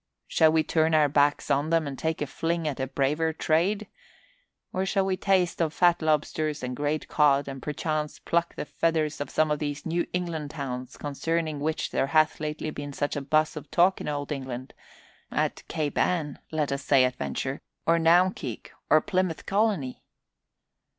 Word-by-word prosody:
Shall 160 -1 +4
we 160 0 +3
turn 160 0 +2
our 150 -1 +5
backs 145 +1 +2
on 145 +3 +2
them 165 -1 +2
and 140 -1 -4
take 160 +1 -2
a - - -2
fling 165 +3 -2
at 140 -3 -3
a 130 - -1
braver 150 +5 0
trade? 175 +7 +1 0.9
Or 185 - 0
shall 195 0 +1
we 190 -1 +1
taste 185 -2 +1
of 160 -1 0
fat 175 -1 +4
lobsters 155 -1 0
and 125 0 -3
great 145 +3 -1
cod, 145 -2 +3
and 135 -1 -6
perchance 150 +1 -2
pluck 170 0 -1
the - - -4
feathers 155 -1 0
from 145 - -4
some 155 -1 +1
of 150 - 0
these 145 -1 -4
New 170 +1 0
England 170 -4 -3
towns 130 -4 -5
concerning 155 +1 -2
which 155 +2 -2
there 135 - +1
hath 155 +1 +3
lately 155 0 -3
been 145 -1 -6
such 145 +1 -2
a 145 - -2
buzz 155 +3 +1
of 150 -1 -8
talk 185 +3 +3
in - - -5
old 145 0 -3
England 130 -2 -5 0.6
at - - -1
Cape 150 -3 -2
Ann, 155 -6 0
let 155 -3 0
us 140 0 -2
say 135 -2 +5
at 125 0 -2
venture, 135 +1 -3 0.2
or 165 0 +4
Naumkeag, 165 - +2 0.2
or 155 - +6
Plymouth 185 -3 -1
Colony?" 195 - 0
155 Hz, 185 wpm, -27 LUFS, 145-165 Hz, 0.9 s, or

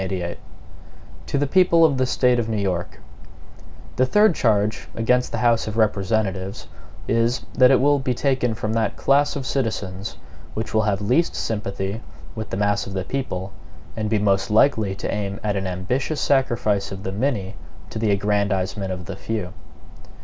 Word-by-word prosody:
MADISON 90 -2 -3 0.9
To - - -1
the 145 - +2
People 170 +1 +5
of 140 -4 +2
the 130 - +2
State 125 -1 +2
of 115 -1 -2
New 110 - -1
York: 95 -4 -2 1.0
THE 130 - +4
THIRD 210 +6 +5
charge 110 -6 +1
against 125 +2 +1
the - - -2
House 115 -2 +2
of 110 +1 -4
Representatives 100 -2 0 0.4
is, 115 +2 +1
that 130 -1 +6
it 135 - +5
will 145 +1 +3
be 130 -2 -1
taken 130 -4 0
from 110 0 -3
that 110 -2 0
class 140 +1 +2
of 135 -2 -4
citizens 105 -7 -3 0.4
which 110 0 -4
will 110 - +3
have 105 -2 0
least 125 +11 +1
sympathy 100 0 -3 0.3
with 110 -1 -6
the - - -3
mass 105 0 +1
of 100 - -6
the 95 -1 -2
people, 95 -6 -4 0.4
and 110 -1 -2
be 110 - +2
most 100 -2 +1
likely 110 -3 +3
to - - -3
aim 100 -1 -3
at 105 -1 0
an 95 -1 -2
ambitious 125 - -2
sacrifice 120 -8 +1
of 95 0 -7
the 95 - -3
many 105 -3 -1 0.4
to - - -4
the 110 -1 +1
aggrandizement 100 -1 0
of 90 -1 -5
the 100 - -6
few. 100 -2 -4
110 Hz, 175 wpm, -22 LUFS, 100-125 Hz, 1.0 s, that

